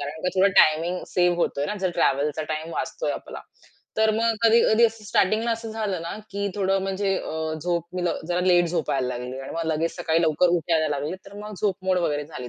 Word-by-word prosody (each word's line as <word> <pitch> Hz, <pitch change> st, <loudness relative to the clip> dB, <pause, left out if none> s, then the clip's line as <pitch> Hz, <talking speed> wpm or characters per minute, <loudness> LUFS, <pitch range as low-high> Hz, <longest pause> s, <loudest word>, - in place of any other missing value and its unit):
कारण 145 Hz, +2 st, -5 dB
का -, -, +3 dB
थोडा 195 Hz, +1 st, +6 dB
टायमिंग 165 Hz, +4 st, +2 dB
सेव्ह 175 Hz, -1 st, +3 dB
होतोय 145 Hz, -4 st, 0 dB
ना. 210 Hz, -, -2 dB
जर 185 Hz, -, 0 dB
ट्रॅव्हलचा 145 Hz, +3 st, +1 dB
टाईम 160 Hz, +2 st, -5 dB
वाचतोय -, -, -2 dB
आपला. -, -, -8 dB, 0.6 s
तर 220 Hz, 0 st, +4 dB
मग 230 Hz, 0 st, +2 dB
कधी-कधी 230 Hz, 0 st, +5 dB
असं 225 Hz, -1 st, -7 dB
स्टार्टिंगला 215 Hz, +4 st, +1 dB
असं 225 Hz, -1 st, -5 dB
झालं 205 Hz, -6 st, -2 dB
ना, 170 Hz, +4 st, -5 dB
की 200 Hz, 0 st, -2 dB
थोडं 195 Hz, -1 st, +1 dB
म्हणजे 195 Hz, 0 st, 0 dB
अ, 160 Hz, 0 st, -3 dB
झोप 170 Hz, -1 st, -1 dB
मी 180 Hz, -, -1 dB
लव -, -, -1 dB
जरा 175 Hz, 0 st, 0 dB
लेट 175 Hz, -1 st, +5 dB
झोपायला 135 Hz, -6 st, -1 dB
लागली 125 Hz, +1 st, -5 dB
आणि 135 Hz, -, -8 dB
मग 165 Hz, -1 st, -2 dB
लगेच 160 Hz, +2 st, -1 dB
सकाळी 160 Hz, +1 st, +1 dB
लवकर 165 Hz, +2 st, +3 dB
उठायला 160 Hz, -1 st, +1 dB
लागली, 150 Hz, +5 st, -3 dB
तर 200 Hz, -, -12 dB
मग 210 Hz, -, -7 dB
झोप 200 Hz, -3 st, +1 dB
मोड 185 Hz, -1 st, +3 dB
वगैरे 150 Hz, -4 st, -1 dB
झाली 125 Hz, -6 st, -8 dB
175 Hz, 210 wpm, -24 LUFS, 155-200 Hz, 0.6 s, थोडा